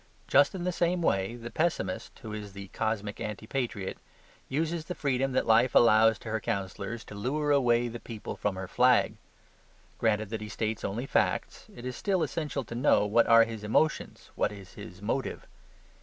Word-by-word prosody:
Just 145 +6 +4
in 180 - -4
the 180 - 0
same 175 0 0
way 95 -2 +1
the 120 0 -8
pessimist 155 - -2
(who 110 -2 -6
is 105 -2 -7
the 100 0 -9
cosmic 110 -1 -2
anti 105 0 -5
patriot) 115 -6 -3 0.5
uses 160 +3 -1
the 180 - -5
freedom 135 -1 0
that - - +1
life 115 +3 +4
allows 110 -1 +6
to 110 - -9
her 110 0 -1
counsellors 100 +3 -4
to - - -11
lure 140 +8 -1
away 120 -4 +3
the 120 0 -6
people 115 -3 -7
from 100 -2 -2
her 95 0 -5
flag. 125 +5 +4 0.9
Granted 110 -2 +1
that 110 -1 -3
he 105 - -6
states 110 +1 -3
only 110 +6 -2
facts, - - 0
it 120 - -9
is 125 - -4
still 190 -4 0
essential 150 -2 -2
to 115 - -9
know 120 -4 +3
what 115 +3 +3
are 115 0 +8
his 115 -2 -6
emotions, 150 +9 0
what - - 0
is 100 -2 -11
his 100 -2 -11
motive. 130 +5 -2
115 Hz, 185 wpm, -29 LUFS, 105-135 Hz, 0.9 s, are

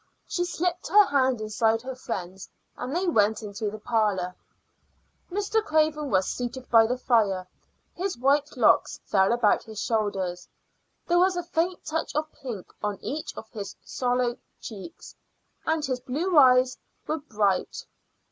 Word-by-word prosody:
She 350 - -1
slipped 355 0 -2
her 415 +5 +7
hand 260 - +2
inside 220 +1 +1
her 260 +1 -5
friend's, 190 -7 -6 0.3
and 265 +5 -4
they 365 +2 +1
went 220 -7 +2
into 210 +1 -3
the 215 - -7
parlor. 210 -5 0 1.0
Mr. 410 +3 0
Craven 310 -3 +1
was 190 -2 +2
seated 245 +1 -4
by 225 -1 +7
the 250 +2 -1
fire. 205 -7 +1 0.5
His 370 -2 -3
white 280 +3 +1
locks - - +3
fell 190 0 +3
about 235 -3 +3
his 220 -2 -9
shoulders; 195 -6 -1 0.6
there 350 0 +3
was 370 +1 +3
a 350 - -1
faint 345 +1 -1
touch 315 -1 -3
of 305 +1 -1
pink 235 -9 -8
on 210 -1 -2
each 300 +2 -4
of 220 - -8
his 200 -3 -6
sallow 245 -1 0 0.2
cheeks, 220 - -10 0.5
and 315 -1 +1
his 255 -3 -2
blue 315 +9 -2
eyes 255 -2 +6 0.3
were 315 - -2
bright. 205 -9 -1
250 Hz, 150 wpm, -26 LUFS, 215-310 Hz, 1.0 s, her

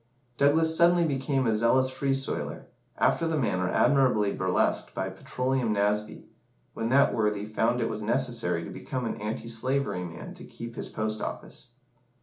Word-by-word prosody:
Douglas 160 +4 +3
suddenly 170 +1 +4
became 135 -2 0
a 110 -2 +2
zealous 130 +4 +3
"Free 135 +1 0
Soiler," 135 0 -3 0.3
after 165 - +2
the 160 -1 0
manner 90 -8 0
admirably 125 -7 +3
burlesqued 95 -1 0
by - - -2
"Petroleum 125 -2 -1
Nasby," 105 +1 -1 0.5
when 115 - -2
that 140 +3 +4
worthy 105 -2 0
found 115 +3 0
it 115 - +1
was 110 -1 -4
necessary 105 - 0
to - - -7
become 130 -2 -4
an 115 - -4
anti 110 +2 -4
slavery 125 -3 -1
man 85 -2 -8
to - - -11
keep 115 0 -9
his - - -5
post 110 0 -3
office. - - -6
120 Hz, 160 wpm, -27 LUFS, 105-135 Hz, 0.5 s, suddenly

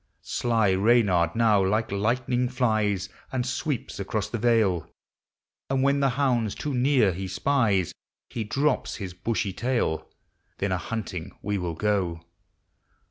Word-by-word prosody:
Sly 115 -4 +1
Reynard 95 -5 +3
now 110 -4 +4
like 110 +3 0
lightning 120 +4 0
flies, 110 -6 +1 0.2
And 125 -2 -1
sweeps 130 -1 -3
across 105 +1 -2
the 120 - -3
yale; 110 -7 +2 0.8
And 135 0 +1
when 140 +1 +3
the 135 -1 +3
hounds 120 -7 +1
too 150 - -3
near 125 -6 +3
he 95 +2 -4
spies, 100 - +1 0.3
He 115 - -4
drops 140 +8 0
his 95 -4 -6
bushy 100 +1 -2
tail. 120 -8 -1 0.5
Then 100 -1 -1
a 90 - 0
hunting 100 -7 -5
we 105 -1 -1
will 85 -2 -3
go. 90 -4 -1
110 Hz, 135 wpm, -26 LUFS, 95-125 Hz, 0.8 s, now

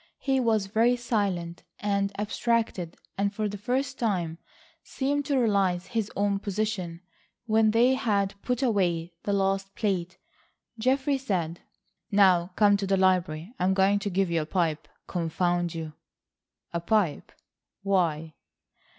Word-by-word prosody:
He 270 -1 0
was 220 -5 +2
very 225 +5 +3
silent 200 -8 -2 0.2
and 200 -1 0
abstracted 210 -5 -1 0.2
and 200 0 +1
for 215 +1 -2
the 205 - -5
first 260 +4 -2
time 175 -8 -1 0.4
seemed 285 +1 -2
to 280 -1 +1
realise 195 -7 +2
his 220 0 -2 0.3
position. 200 -5 -3 0.4
When 220 -1 +3
they 235 +4 +4
had 205 -6 0
put 250 +1 -1
away 175 -7 +1
the 205 - 0
last 195 0 0
plate, 185 -5 -1 0.6
Geoffrey 270 +3 +1
said: 175 -9 -2 0.5
"Now 185 -4 +4
come 205 -1 +5
to 195 -1 -3
the 195 0 +2
library. 185 0 +1
I - - 0
am 190 +1 +3
going 195 +1 +3
to 200 - -3
give 190 -1 0
you 165 -1 +1
a - - -4
pipe, 165 -3 -1 0.2
confound 175 0 -1
you." 160 -2 -5 0.8
"A 170 - 0
pipe! 195 -4 0 0.5
Why?" 165 -5 0
200 Hz, 140 wpm, -27 LUFS, 175-220 Hz, 0.8 s, come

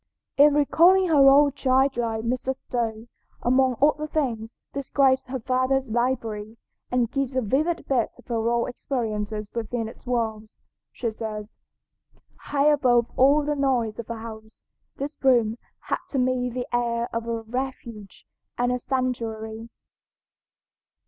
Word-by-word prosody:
In 290 +1 +6
recalling 350 +6 +4
her 280 -4 +7
own 285 +1 +6
child 265 0 +2
life 225 -2 -2
Mrs. 255 +2 -1
Stowe, 230 -4 -3 0.4
among 255 +1 +3
other 300 +2 +2
things, 240 -8 -3
describes 270 -1 +1
her 260 0 -4
father's 255 +1 0
library, 225 -3 -2 0.3
and 245 -2 0
gives 275 -2 -2
a 260 - +2
vivid 310 +10 0
bit 250 -4 +1
of - - -18
her 230 -1 -1
own 235 0 +1
experiences 215 -5 -3
within 230 0 -3
its 225 - -13
walls. 220 -3 -2 0.3
She 235 -2 -3
says: 215 -1 -7 0.8
"High 285 +1 +1
above 245 -5 +3
all 280 +3 +5
the 295 0 0
noise 250 -6 0
of 235 - -6
the 230 - -4
house, 220 -1 -10 0.3
this 285 +2 -5
room 240 -4 +3 0.2
had - - -2
to 275 - -3
me 250 -1 +1
the 245 0 -4
air 235 -1 0
of 230 0 -3
a 230 -1 -2
refuge 235 -4 -6 0.3
and 245 0 +1
a 250 - -1
sanctuary. 230 -4 -3
245 Hz, 140 wpm, -25 LUFS, 225-270 Hz, 0.8 s, her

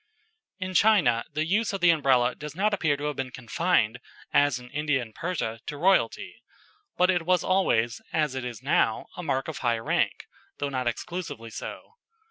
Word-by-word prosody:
In 185 0 -4
China 185 - +4
the 155 +1 -1
use 205 +5 +1
of 195 - -3
the 175 -1 +7
Umbrella 130 -6 +3
does 150 0 -8
not 210 +3 +1
appear 155 -7 +1
to 145 - -7
have 150 -1 -2
been 130 -1 -3
confined, 130 -2 0 0.3
as 145 -2 +4
in 125 0 -12
India 150 -2 0
and 115 -3 -7
Persia, 150 -10 -3
to 145 - -4
royalty; 190 +5 +1 0.6
but 180 +1 +4
it 175 -1 +1
was 180 0 +2
always, 120 -12 +1
as 150 -4 +1
it 130 -1 -4
is 120 -4 -6
now, 110 - +2
a - - -5
mark 135 -5 -1
of 160 - -5
high 120 -2 +1
rank, 115 - 0 0.3
though 145 - -2
not 130 -2 -2
exclusively 120 -3 -4
so. 455 - -8
150 Hz, 185 wpm, -27 LUFS, 125-180 Hz, 0.6 s, the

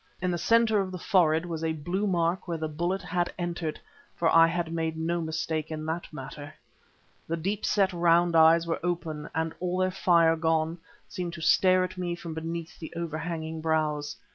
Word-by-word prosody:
In 180 0 0
the 175 - -1
centre 230 0 +3
of 190 -1 -4
the 185 - -5
forehead 170 -3 +2
was 165 -2 -4
a 160 0 0
blue 175 +7 -2
mark 175 0 0
where 170 -1 -2
the 160 0 -3
bullet 175 +5 -2
had 175 0 -1
entered, 175 -3 -3 0.4
for 170 - +1
I 165 0 +8
had 165 -1 -2
made 160 -1 -2
no 170 +2 -1
mistake 160 -1 -2
in 155 -1 -5
that 165 +2 -4
matter. 145 0 -8 0.7
The 165 - -1
deep 195 +6 -2
set 195 -2 +2
round 170 0 +3
eyes 165 +1 +6
were 165 - -2
open 165 -4 -3
and, 160 0 -1
all 180 0 -1
their 185 0 +1
fire 170 -3 +4
gone, 160 +1 0 0.3
seemed 175 -2 -5
to 170 - -8
stare 185 +2 +4
at 185 0 -5
me 175 -1 -2
from 170 -2 -7
beneath 165 +1 -5
the 160 - -7
overhanging 160 -1 -4
brows. 155 -2 0
165 Hz, 190 wpm, -28 LUFS, 160-175 Hz, 0.7 s, I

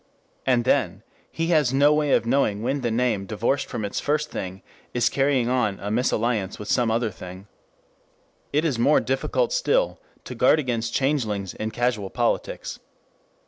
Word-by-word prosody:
And 120 -3 +3
then - - +1 0.3
he 165 +1 -2
has 150 -6 +3
no 145 +2 +5
way 150 -2 +2
of 115 - +3
knowing 115 -4 +1
when 135 +3 -1
the 120 - 0
name 115 -4 0
divorced 115 +6 -1
from 110 - -4
its 100 - -3
first 150 +1 -1
thing 95 +1 -6 0.3
is 120 -1 +3
carrying 135 -3 +1
on 115 -6 0
a 105 - -4
misalliance 115 -4 0
with 105 0 -8
some 120 -2 +2
other 115 0 0
thing. 90 +1 -10 1.1
It 150 +3 +1
is 135 -8 0
more 145 +6 +4
difficult 135 - 0
still - - +1 0.2
to - - -7
guard - - +4
against 120 -5 -2
changelings 110 -9 0
in 110 - -4
casual 120 -4 -1
politics. 120 +2 -2
120 Hz, 165 wpm, -24 LUFS, 110-140 Hz, 1.1 s, no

